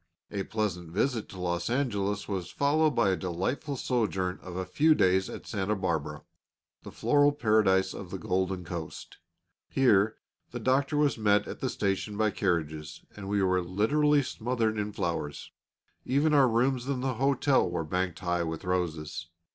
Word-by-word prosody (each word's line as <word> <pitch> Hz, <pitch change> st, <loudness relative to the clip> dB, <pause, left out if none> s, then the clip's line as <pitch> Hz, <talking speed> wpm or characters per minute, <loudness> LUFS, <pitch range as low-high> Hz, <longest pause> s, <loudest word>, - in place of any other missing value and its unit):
A 100 Hz, -, -2 dB
pleasant 95 Hz, -6 st, -2 dB
visit 110 Hz, +6 st, -1 dB
to 95 Hz, -, -10 dB
Los 85 Hz, +1 st, -1 dB
Angeles 105 Hz, -6 st, -1 dB
was 95 Hz, -4 st, -3 dB
followed 150 Hz, +2 st, +2 dB
by 110 Hz, -5 st, +3 dB
a -, -, +2 dB
delightful 95 Hz, -, -3 dB
sojourn 95 Hz, -8 st, -1 dB
of 90 Hz, -1 st, -8 dB
a 95 Hz, 0 st, -2 dB
few 155 Hz, -, +3 dB
days 95 Hz, -3 st, +3 dB
at -, -, -8 dB
Santa 105 Hz, 0 st, -1 dB
Barbara, 85 Hz, -6 st, -2 dB, 0.6 s
the -, -, -10 dB
floral 145 Hz, 0 st, +3 dB
paradise 105 Hz, -8 st, +2 dB
of 95 Hz, -, -8 dB
the 95 Hz, -, -4 dB
Golden 95 Hz, +1 st, -1 dB
Coast; 85 Hz, -2 st, -7 dB, 0.5 s
here 110 Hz, -5 st, +3 dB, 0.3 s
the -, -, -6 dB
Doctor 135 Hz, +3 st, +1 dB
was 145 Hz, -5 st, +2 dB
met 105 Hz, -1 st, +3 dB
at -, -, -7 dB
the -, -, -1 dB
station 100 Hz, +1 st, -2 dB
by 110 Hz, -1 st, +2 dB
carriages, 80 Hz, -6 st, -2 dB
and 100 Hz, -1 st, -7 dB
we 100 Hz, -1 st, +1 dB
were 90 Hz, -1 st, +2 dB
literally 140 Hz, +11 st, +2 dB
smothered 115 Hz, -3 st, -1 dB
in 105 Hz, 0 st, -2 dB
flowers; 85 Hz, -7 st, -3 dB, 0.5 s
even 145 Hz, +4 st, +2 dB
our 140 Hz, -3 st, +6 dB
rooms 125 Hz, +2 st, +1 dB
in 135 Hz, -2 st, -1 dB
the 130 Hz, 0 st, 0 dB
hotel 135 Hz, -5 st, +3 dB
were 85 Hz, -1 st, -2 dB
banked 90 Hz, +1 st, -1 dB
high 90 Hz, -1 st, 0 dB
with 80 Hz, -1 st, -4 dB
roses. 85 Hz, -4 st, -2 dB
100 Hz, 165 wpm, -29 LUFS, 90-125 Hz, 0.6 s, our